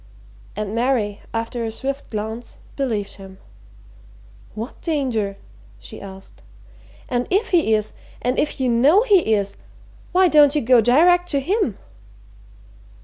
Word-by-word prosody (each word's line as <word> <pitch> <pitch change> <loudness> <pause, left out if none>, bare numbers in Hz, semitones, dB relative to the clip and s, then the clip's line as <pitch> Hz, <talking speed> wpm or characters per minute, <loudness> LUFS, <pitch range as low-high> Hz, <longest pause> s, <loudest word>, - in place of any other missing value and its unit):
And 210 0 -4
Mary, 230 -4 0
after 230 +1 -3
a 225 - -2
swift 275 +4 -5
glance, 220 +2 -6 0.2
believed 220 -9 -3
him. 190 -1 -12 1.2
"What 225 +4 -7
danger?" 245 - -1 0.4
she 100 - -11
asked. 195 -1 -12 0.7
"And 245 0 -1
if 410 +4 +1
he 325 - +3
is, 215 0 -3 0.3
and 250 +1 -1
if 295 - -1
you 260 - +1
know 275 - +4
he 370 - +3
is 200 -1 -3 0.5
why 370 +1 +4
don't 295 -3 +5
you 300 - +2
go 245 0 +5
direct 350 +10 +4
to 280 - +1
him?" 340 - -1
245 Hz, 135 wpm, -21 LUFS, 215-300 Hz, 1.2 s, don't